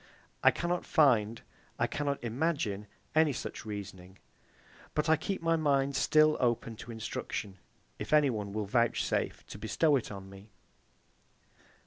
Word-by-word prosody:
I - - +9
cannot 175 0 -1
find, 115 -8 +3 0.3
I - - +2
cannot 140 -2 -2
imagine 120 -5 -1 0.3
any 155 -2 +4
such 115 - -6
reasoning. 95 -3 -7 0.8
But 150 +1 +1
I 160 - +7
keep 170 +3 -4
my 165 0 +3
mind 140 -3 +1
still 155 +2 +4
open 120 -2 0
to 120 - -9
instruction, 105 -3 -5 0.4
if - - -5
any 150 -3 +5
one 105 -3 -4
will 105 0 -2
vouchsafe 115 +3 0
to - - -9
bestow 145 +8 +2
it 120 - -5
on 95 -1 -8
me. 95 +2 -13
120 Hz, 140 wpm, -31 LUFS, 105-150 Hz, 0.8 s, I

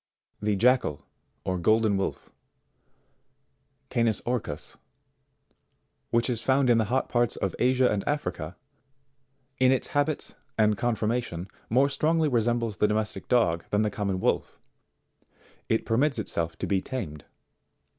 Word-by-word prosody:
59. - - -7
The 105 -1 +2
Jackal, 115 - +2 0.4
or 95 -1 -1
Golden 110 +2 +3
Wolf, 95 0 -3 1.6
Canis 115 -3 +2
Marcus, 115 -12 -3 1.3
which 115 0 +2
is 120 -3 -1
found 130 +2 +3
in 115 - +4
the 110 - +2
hot 130 +5 0
parts 120 -2 +1
of 95 - -2
Asia 130 +1 +4
and 105 -4 0
Africa, 145 - -3 1.0
in 130 0 +5
its 130 - 0
habits 145 +1 -1 0.2
and 105 -1 +4
con 120 +3 0
formation, 110 -5 -2 0.2
more 130 +5 +4
strongly 155 +3 +1
resembles 115 -3 0
the 105 - +3
domestic 105 -2 -2
dog 85 -10 +2
than 105 +1 +2
the 105 - 0
common 100 -2 -2
wolf - - -1 1.1
It 110 - +1
permits 130 +4 +2
itself 85 -6 -2
to - - -3
be 95 -2 +1
tamed. 95 - -6
115 Hz, 135 wpm, -27 LUFS, 100-125 Hz, 1.6 s, in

